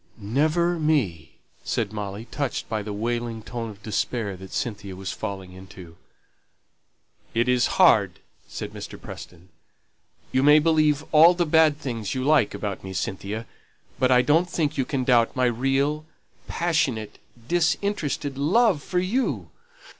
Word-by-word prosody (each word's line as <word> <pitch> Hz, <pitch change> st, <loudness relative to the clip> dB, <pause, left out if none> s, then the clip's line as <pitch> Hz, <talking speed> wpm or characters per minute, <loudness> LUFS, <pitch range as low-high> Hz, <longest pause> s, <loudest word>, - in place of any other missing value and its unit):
"Never 155 Hz, +11 st, +1 dB
me," 105 Hz, -, 0 dB, 0.3 s
said 110 Hz, -3 st, -2 dB
Molly, 105 Hz, +1 st, -5 dB
touched 140 Hz, -3 st, -3 dB
by 110 Hz, -2 st, -2 dB
the 105 Hz, +1 st, -6 dB
wailing 115 Hz, +1 st, -3 dB
tone 115 Hz, 0 st, -5 dB
of 105 Hz, 0 st, -13 dB
despair 110 Hz, -1 st, -2 dB
that 95 Hz, +1 st, -11 dB
Cynthia 100 Hz, -5 st, -4 dB
was 95 Hz, +1 st, -5 dB
falling 95 Hz, -4 st, -6 dB
into. 90 Hz, -2 st, -12 dB, 1.4 s
"It 120 Hz, +2 st, +2 dB
is 125 Hz, -1 st, +3 dB
hard," -, -, +5 dB, 0.3 s
said -, -, -6 dB
Mr. -, -, -8 dB
Preston. 90 Hz, +1 st, -11 dB, 0.8 s
"You 130 Hz, -, +2 dB
may 150 Hz, +2 st, +7 dB
believe 155 Hz, -1 st, +2 dB
all 165 Hz, +3 st, +7 dB
the 175 Hz, 0 st, +1 dB
bad 155 Hz, -1 st, +4 dB
things 115 Hz, -8 st, -4 dB
you 130 Hz, -, -2 dB
like 140 Hz, -8 st, +3 dB
about 100 Hz, -1 st, -4 dB
me, 95 Hz, 0 st, -7 dB
Cynthia, 100 Hz, +4 st, -4 dB, 0.5 s
but 130 Hz, -1 st, +3 dB
I 125 Hz, -1 st, +5 dB
don't 165 Hz, +6 st, +3 dB
think 155 Hz, -4 st, -1 dB
you 135 Hz, -, 0 dB
can 130 Hz, -1 st, -2 dB
doubt 120 Hz, -2 st, +3 dB
my 130 Hz, -1 st, +2 dB
real, 135 Hz, +5 st, 0 dB, 0.4 s
passionate, 140 Hz, -11 st, -1 dB, 0.3 s
disinterested 160 Hz, -4 st, -1 dB
love 190 Hz, +2 st, +3 dB
for 180 Hz, -, -4 dB
you." 205 Hz, +9 st, -1 dB
125 Hz, 145 wpm, -24 LUFS, 105-155 Hz, 1.4 s, may